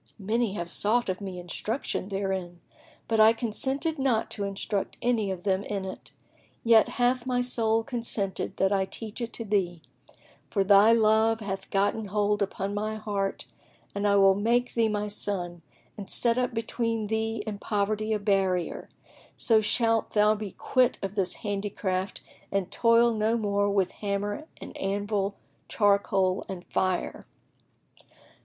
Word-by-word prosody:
Many 220 +1 0
have 175 -4 -4
sought 215 +6 +2
of 185 +2 -3
me 190 -2 -6
instruction 190 +4 -4
therein, 190 -3 -3 0.5
but 225 -1 +1
I 220 +1 +7
consented 265 +7 -1
not 250 -5 +1
to 205 - -3
instruct 200 0 -3
any 235 -4 +1
of 185 -2 -4
them 190 -1 +1
in 200 -2 -4
it; 190 - -8 0.5
yet 230 -1 +5
hath 250 0 +1
my 250 -1 +1
soul 225 -2 +1
consented 230 -6 -3
that 195 0 +2
I 195 -1 +2
teach 220 +4 -5
it 235 -1 -3
to 230 - -6
thee, 180 -6 -1 0.7
for 195 - +1
thy 200 +3 +6
love 220 0 +4
hath 195 -2 -5
gotten 205 +2 +1
hold 205 +1 0
upon 195 0 -2
my 215 +1 -2
heart 205 -2 -3 0.5
and 200 +1 0
I 200 - +4
will 195 -1 +6
make 235 +5 +1
thee 225 -1 +2
my 210 0 -1
son 180 -4 -4 0.3
and 200 -2 -8
set 235 -1 +2
up 250 0 0
between 230 -1 -2
thee 220 0 -2
and 210 -2 -5
poverty 215 +1 -1
a 215 - +2
barrier, 195 -4 0 0.5
so 225 -2 +4
shalt 225 +1 +1
thou 210 0 +5
be 210 -3 -6
quit 255 -1 +1
of 195 0 -3
this 195 -3 0
handicraft 195 -2 -2 0.3
and 195 -2 -1
toil 230 0 +4
no 220 +1 +1
more 205 -2 +1
with 195 -2 +1
hammer 205 +7 -3
and - - -10
anvil,[FN#10] 200 0 -1 0.3
charcoal 200 -2 +2
and 185 -2 -6
fire." 185 -1 -2
205 Hz, 155 wpm, -27 LUFS, 195-225 Hz, 0.7 s, I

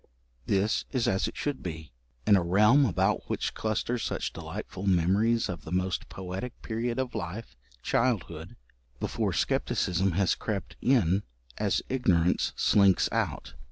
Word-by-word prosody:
This 100 +1 +1
is 130 -4 0
as 95 0 +1
it - - -7
should 145 -2 -2
be, 80 -5 -6 0.3
in 105 - +6
a 95 - +4
realm 105 +11 +5
about 90 - 0
which - - -2
cluster 110 +2 -1
such - - -3
delightful 100 +2 -6
memories 100 +6 +3
of 90 -4 -6
the 80 - -9
most 90 0 -1
poetic 95 +6 -6
period 115 +1 -2
of 130 -1 -2
life 100 - -5 0.3
childhood, 90 -9 -1 0.4
before - - -1
scepticism 90 +1 0
has 95 +1 +2
crept 105 -3 -4
in 100 -8 +3 0.4
as - - +1
ignorance 90 -9 +2
slinks 100 -3 +4
out. - - -2
100 Hz, 140 wpm, -28 LUFS, 90-115 Hz, 0.4 s, in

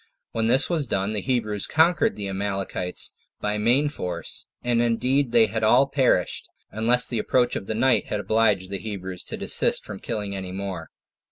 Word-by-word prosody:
When 115 0 -1
this 130 +4 +5
was 160 -6 0
done, 100 0 -1
the 105 - -1
Hebrews 110 -6 0
conquered 175 +8 +3
the 100 - -5
Amalekites 95 -2 -2 0.3
by 105 0 -2
main 125 +7 +3
force; 90 - -3 0.2
and 120 -1 +1
indeed 125 +3 +1
they 115 -2 +5
had 110 +1 -3
all 120 +5 +5
perished, 130 - 0 0.2
unless 120 +3 +2
the 120 - -2
approach 120 +2 +1
of 95 - -5
the 110 - -2
night 130 +3 +2
had 105 - -2
obliged 100 -2 +1
the 100 - -3
Hebrews 95 -3 -6
to - - -5
desist - - +1
from - - -8
killing 100 -2 -4
any 95 -1 -6
more. 95 0 -5
110 Hz, 180 wpm, -24 LUFS, 100-125 Hz, 0.3 s, this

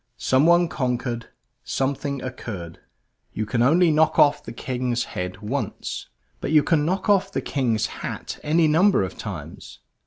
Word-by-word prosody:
Someone 170 +6 +4
conquered; 125 -5 -2 0.4
something 140 +2 -2
occurred. 100 -9 -7 0.5
You 110 - -2
can 115 +2 -1
only 165 +7 +5
knock 155 +1 +3
off 145 0 +4
the - - -8
King's 125 0 -2
head 90 +2 -5
once. 135 +7 -4 0.3
But - - -4
you 155 -2 +5
can 160 -4 +2
knock 185 +6 -1
off 195 -2 +3
the - - -1
King's 115 -6 0 0.2
hat - - -5
any 160 +2 +3
number 165 - +4
of 95 - -5
times. - - -8
135 Hz, 150 wpm, -23 LUFS, 120-160 Hz, 0.5 s, only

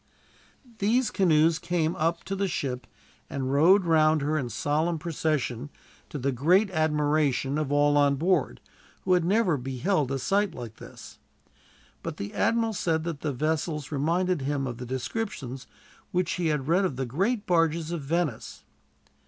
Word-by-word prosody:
These 230 +4 +2
canoes 165 -3 +3
came 170 -2 -1
up 165 +2 -1
to 195 - -4
the 195 0 0
ship 130 -7 -3 0.4
and 135 -1 -2
rowed 180 +7 +5
round 155 -2 +4
her 150 +2 0
in 135 -6 -1
solemn 155 +6 0
procession, 150 -5 -2 0.4
to - - -5
the 140 +1 0
great 180 - +3
admiration 150 -3 +1
of 150 -2 -2
all 145 0 +3
on 140 -1 +4
board, 160 - 0 0.4
who 185 - +2
had 180 -2 +3
never 185 -3 +2
beheld 135 +4 -1
a 135 - 0
sight 200 +8 0
like 115 -3 -8
this. - - -12 0.8
But - - -6
the 100 - -6
admiral 225 +1 +1
said 160 -5 0
that 165 -4 -5
the 150 - -1
vessels 155 +2 -2
reminded 170 +4 0
him 140 0 -1
of 120 -2 -5
the 125 - -6
descriptions 130 - -4 0.4
which 180 -1 0
he 175 -2 -1
had 150 -3 -1
read 175 +5 +3
of 180 -8 -1
the 130 +1 -2
great 200 - -1
barges 165 -1 +1
of 170 -3 -3
Venice. 150 -3 -2
155 Hz, 160 wpm, -27 LUFS, 140-180 Hz, 0.8 s, rowed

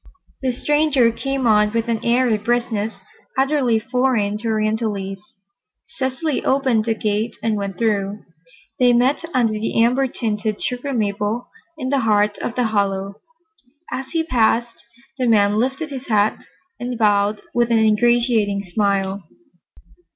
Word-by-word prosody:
The 260 -1 0
stranger 290 -2 +2
came 270 +2 -3
on 210 -1 +3
with 230 0 -1
an 230 -1 -1
airy 240 -1 +3
briskness 220 -3 -1 0.4
utterly 265 -4 +2
foreign 225 -3 0
to 230 - -5
Orientalites. 215 -3 -1 0.6
Cecily 275 0 -2
opened 260 -5 +2
the 225 -1 0
gate 215 +2 -1
and 225 -1 +1
went 200 -2 -4
through. 205 -2 -1 0.6
They 245 -1 +5
met 255 +6 +2
under 240 -6 +2
the 215 +1 -2
amber 250 +4 +3
tinted 215 -3 -3
sugar 250 +3 -3
maple 210 0 -2 0.3
in 260 -4 -3
the 280 0 +2
heart 210 -3 +2
of 235 - -4
the 250 - +1
hollow. 200 -3 -1 0.7
As 265 0 -4
he 330 -1 0
passed, 235 -4 +1 0.4
the 250 - +1
man 210 -2 +3
lifted 265 +6 -2
his 265 -1 -7
hat 215 -2 +1 0.3
and 245 0 -4
bowed 205 -1 +2
with 240 0 +2
an 230 - +3
ingratiating 220 -2 +2
smile. 195 0 -1
225 Hz, 140 wpm, -20 LUFS, 210-250 Hz, 0.7 s, They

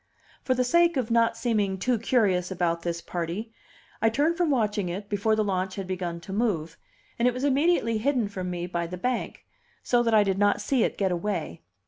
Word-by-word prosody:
For 255 - 0
the 255 - +2
sake 340 +4 +3
of 245 -3 -1
not 230 0 +3
seeming 210 -5 0
too 240 +4 0
curious 205 -7 +1
about 170 -2 -1
this 170 0 -3
party, 180 +6 -4 0.5
I 225 - +4
turned 290 +8 +1
from 345 -2 +1
watching 210 -8 0
it 200 +4 -5
before 210 +2 +1
the 215 - +1
launch 185 -2 -2
had 195 - -4
begun 180 -2 -4
to 190 +3 -8
move, 180 -8 -1 0.4
and 240 - +3
it 250 - +1
was 255 - -4
immediately 280 -5 +2
hidden 245 -2 +1
from 185 -2 -5
me 175 -1 -3
by 170 -1 -3
the 180 +2 -6
bank, 250 +5 -3 0.4
so 245 -1 +3
that 230 -2 +2
I 210 - +6
did 195 -1 -1
not 205 0 +3
see 245 +2 +1
it - - -1
get 190 -2 +1
away. 175 - -3
210 Hz, 210 wpm, -26 LUFS, 180-240 Hz, 0.5 s, I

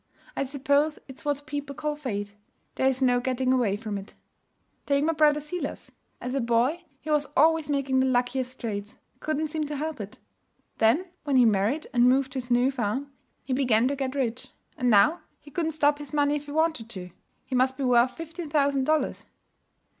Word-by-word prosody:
I - - -1
suppose 285 +2 +1
it's 265 -1 -10
what 290 -1 -1
people 285 -1 -5
call 300 +1 -2
Fate. 205 -8 -4 0.4
There's 265 0 +1
no 245 -1 +4
getting 255 +1 0
away 225 -6 +1
from 210 -2 -4
it. 195 - -13 0.7
'Take 280 0 +2
my 325 +2 +2
brother 300 -1 +4
Silas. 300 +4 -5 0.3
As 250 +1 -4
a 275 - 0
boy, 240 +9 +1 0.2
he 310 - -4
was 295 -1 +2
always 320 +1 +4
making 275 -2 +1
the 260 - +3
luckiest 255 +1 0
trades; 205 -3 -5 0.2
couldn't 310 +1 -1
seem 305 -1 -2
to 295 - -4
help 300 -3 -3
it. 205 0 -8 0.6
Then 235 +12 +4 0.2
when 285 -2 0
he 250 -2 +6
married 220 +8 +2
and 245 0 +5
moved 265 +1 +2
to 265 - -5
his 250 0 -7
new 245 +2 +3
farm, 265 +3 -2 0.3
he 260 - -3
began 250 -3 +3
to 285 - -1
get 265 -1 -3
rich; 255 -1 -2 0.3
and 250 - 0
now 225 - +5 0.2
he 290 - -16
couldn't 325 +1 -1
stop 295 -2 +2
his 290 -2 -8
money 290 0 +3
if 295 0 -5
he - - -7
wanted 315 -7 0
to. 180 -5 -8 0.3
He - - -8
must 260 +1 +2
be 280 - -3
worth 250 0 +3
fifteen 330 0 -7
thousand 280 -3 +2
dollars. 310 +1 0
270 Hz, 195 wpm, -26 LUFS, 245-295 Hz, 0.7 s, he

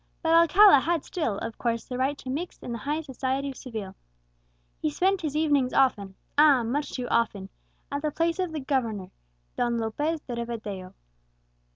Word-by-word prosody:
"But 325 0 +3
Alcala 335 +1 +7
had 330 +2 0
still, 300 - -2
of 225 +1 -6
course, 230 -1 -1
the 250 - -6
right 265 +3 0
to 260 - -9
mix 330 +7 -4
in - - -8
the 235 - -4
highest 300 +6 -2
society 270 0 -2
of - - -11
Seville. 220 -8 -7 0.9
He - - +1
spent 380 - +1
his 305 -3 -3
evenings 290 -5 +2
often 205 -8 +2 0.2
ah! 290 -5 +6
much 280 +5 -2
too 250 -2 -3
often 205 -4 0 0.4
at 285 0 -2
the 305 - 0
palace 330 +4 -1
of 365 -3 -1
the 310 -2 -4
governor, 230 -9 -2 0.4
Don 240 -1 0
Lopez 290 +9 -1
de 245 - -6
Rivadeo." 215 -6 -5
265 Hz, 180 wpm, -27 LUFS, 230-310 Hz, 0.9 s, Alcala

